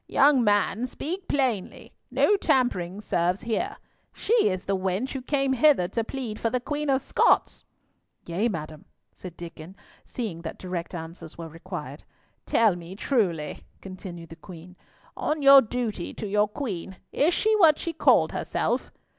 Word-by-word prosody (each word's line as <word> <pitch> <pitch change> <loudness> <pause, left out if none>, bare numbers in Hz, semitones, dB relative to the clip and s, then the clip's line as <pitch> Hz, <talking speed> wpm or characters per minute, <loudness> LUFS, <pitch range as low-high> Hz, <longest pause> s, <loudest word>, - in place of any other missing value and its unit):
"Young 275 -3 +4
man, 205 +3 +2
speak 360 +9 -6
plainly. 250 -9 -2 0.2
No 415 - +3
tampering 210 - 0
serves 180 -2 0
here. 350 - -2 0.3
She 440 - -2 0.2
is 185 -1 -3
the 195 - 0
wench 190 +6 -1
who 265 - -4
came 275 0 0
hither 265 -8 +4
to 230 +3 -1
plead 230 -3 -5
for 230 - 0
the 250 - 0
Queen 295 +3 -3
of 270 -1 +2
Scots." - - +2 0.6
"Yea, 190 +8 0
madam," 155 -5 -6 0.3
said 180 -2 -10
Diccon, 170 +1 -10 0.3
seeing 205 -9 -5
that 160 - -6
direct 180 -1 -5
answers 165 -1 -8
were 165 -1 -7
required. 165 +2 -8 0.4
"Tell 220 -5 +3
me 175 +1 -9
truly," 190 - -1 0.2
continued 180 -3 -9
the 165 - -10
Queen. 180 0 -12 0.4
"On 300 -1 -2
your 275 0 +10
duty 225 -5 -4
to - - -5
your 210 +1 +2
Queen, 195 - -5
is 325 +5 +2
she 435 0 +2
what 320 -7 +6
she 335 - -4
called 325 - +4
herself?" - - -2
210 Hz, 155 wpm, -26 LUFS, 175-270 Hz, 0.6 s, your